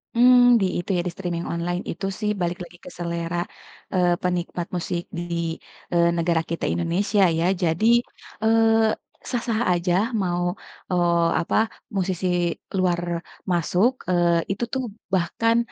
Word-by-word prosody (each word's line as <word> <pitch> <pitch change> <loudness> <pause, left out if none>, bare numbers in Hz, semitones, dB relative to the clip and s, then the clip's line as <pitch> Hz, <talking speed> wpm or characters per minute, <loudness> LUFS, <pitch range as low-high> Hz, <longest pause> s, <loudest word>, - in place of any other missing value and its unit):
Mmm 245 0 +7
di - - +3
itu 175 - -7
ya 175 - +1
di - - -2
streaming 175 -2 -3
online 175 +2 -2
itu 175 - -5
sih 210 -1 0
balik 175 +1 -1
lagi 175 0 -13
ke - - -7
selera, 170 0 -2 0.5
eee, 180 -1 +3
penikmat 180 -1 -2
musik 175 0 -2
di, 170 -1 -3 0.3
eee, 170 -1 +4
negara 170 -1 +2
kita 170 - -4
Indonesia 190 +5 +1 0.2
ya. 170 - +1 0.2
Jadi, 170 +6 +2 0.6
eee, 225 0 +4 0.4
sah-sah 235 -2 -1
aja, 175 0 0 0.3
mau, 175 0 -1 0.4
eee, 170 -1 +3
apa - - -2 0.4
musisi 185 -1 -1 0.5
luar 175 -2 +2 0.5
masuk, 180 +7 +2 0.2
eee, 170 -1 +3
itu 200 +4 -2
tuh 260 -1 0 0.3
bahkan 230 +6 +2
175 Hz, 135 wpm, -24 LUFS, 170-200 Hz, 0.6 s, Mmm